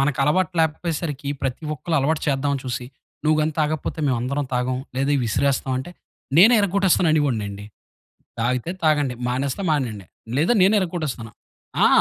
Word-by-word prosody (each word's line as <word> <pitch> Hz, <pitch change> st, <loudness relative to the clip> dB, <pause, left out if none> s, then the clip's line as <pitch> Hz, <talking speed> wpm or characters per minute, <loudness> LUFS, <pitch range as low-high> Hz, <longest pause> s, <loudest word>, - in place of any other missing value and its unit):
మనకలవాటు 150 Hz, +6 st, +2 dB
లేకపోయేసరికి 155 Hz, -2 st, -2 dB
ప్రతి 135 Hz, +3 st, -2 dB
ఒక్కళ్ళు 160 Hz, +3 st, -2 dB
అలవాటు 150 Hz, +3 st, +1 dB
చేద్దాం 140 Hz, 0 st, +1 dB
అని 135 Hz, -, -3 dB
చూసి. 125 Hz, -1 st, -3 dB, 0.4 s
"నువ్వు 155 Hz, 0 st, +3 dB
గాని 155 Hz, +1 st, 0 dB
తాగకపోతే 155 Hz, +1 st, -1 dB
మేము 130 Hz, -3 st, +2 dB
అందరం 140 Hz, +3 st, -1 dB
తాగం 125 Hz, +1 st, 0 dB, 0.2 s
లేదా 135 Hz, +2 st, +1 dB
విసిరేస్తాం" 130 Hz, +4 st, 0 dB
అంటే 155 Hz, +7 st, -6 dB, 0.5 s
నేనే 225 Hz, +7 st, +8 dB
ఇరగొట్టేస్తాననివోడినండి. 155 Hz, -, +1 dB, 0.8 s
"తాగితే 125 Hz, +7 st, 0 dB
తాగండి 145 Hz, -5 st, +2 dB
మానేస్తే 135 Hz, +8 st, -2 dB
మానేయండి." 115 Hz, -, -1 dB, 0.3 s
లేదా 170 Hz, +10 st, +3 dB
నేనే 200 Hz, +3 st, +5 dB
ఇరగ్గొట్టేస్తాను. 155 Hz, -11 st, -4 dB, 0.5 s
ఆ! -, -, +8 dB
145 Hz, 135 wpm, -22 LUFS, 125-160 Hz, 0.8 s, నేనే